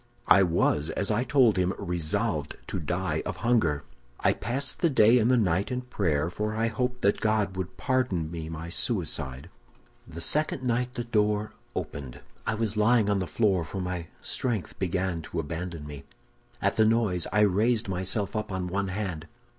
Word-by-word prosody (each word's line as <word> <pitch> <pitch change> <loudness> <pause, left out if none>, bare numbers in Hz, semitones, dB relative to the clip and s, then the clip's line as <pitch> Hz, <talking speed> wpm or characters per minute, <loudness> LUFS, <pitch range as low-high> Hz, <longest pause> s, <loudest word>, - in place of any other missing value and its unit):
I 100 - +7
was, 80 -4 +2
as 100 - 0
I 110 +4 +2
told 120 -5 +4
him, 90 0 +1
resolved 85 -3 -1
to - - -3
die 85 0 -1
of - - -4
hunger. 85 -12 +2 0.4
"I - - +3
passed 130 +3 -3
the 170 - +3
day 120 -3 +6
and 115 +1 +3
the 130 - +5
night 95 -3 +1
in 125 0 -1
prayer, 85 - 0
for 105 +3 -2
I 115 +1 +1
hoped 125 +1 -2
that 100 - +2
God 110 -3 +1
would 95 0 -5
pardon 125 - 0
me 80 -2 -5
my 80 0 -6
suicide. 65 -5 -1 0.6
"The 85 - -8
second 145 - 0
night 125 +1 0
the 120 - -2
door 105 -2 +1 0.2
opened; 65 -3 -5 0.3
I 110 - +1
was 110 -1 -2
lying 105 0 +4
on 100 - +2
the 90 - -2
floor, 95 +1 +2
for 90 +5 -6
my 90 -2 -3 0.2
strength 115 -7 -2
began 90 -2 -1
to 80 - -5
abandon 80 0 -4
me. 70 -2 -9 0.6
"At - - +1
the 110 - +5
noise 110 -6 +2
I 105 +2 +3
raised 105 +3 +3
myself 95 +2 -1
up 110 -1 -2
on 95 -1 -2
one 100 +2 -1
hand. 90 -5 -4
100 Hz, 180 wpm, -27 LUFS, 85-115 Hz, 0.6 s, I